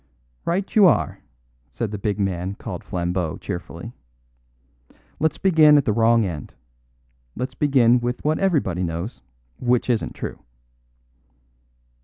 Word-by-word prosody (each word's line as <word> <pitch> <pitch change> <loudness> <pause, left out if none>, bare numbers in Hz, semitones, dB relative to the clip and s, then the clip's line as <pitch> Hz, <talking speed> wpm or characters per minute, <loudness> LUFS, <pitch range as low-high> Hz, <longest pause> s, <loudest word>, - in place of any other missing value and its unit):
"Right 190 +3 -2
you 205 -3 +8
are," 170 - +1 0.5
said 80 - -4
the 105 - -5
big 105 0 -1
man 95 -1 -2
called - - -7
Flambeau 90 -2 -2
cheerfully. 85 +6 -7 1.3
"Let's 160 -1 +1
begin 155 -5 +6
at 140 - +2
the 105 - +2
wrong 115 0 +4
end. 80 -7 -6 0.8
Let's 125 +2 -4
begin 125 -4 +4
with 120 +3 -3
what 155 +1 +1
everybody 145 - +1
knows, 85 +5 -4 0.4
which 125 0 +1
isn't 115 - -2
true." - - -6
115 Hz, 125 wpm, -22 LUFS, 90-145 Hz, 1.3 s, you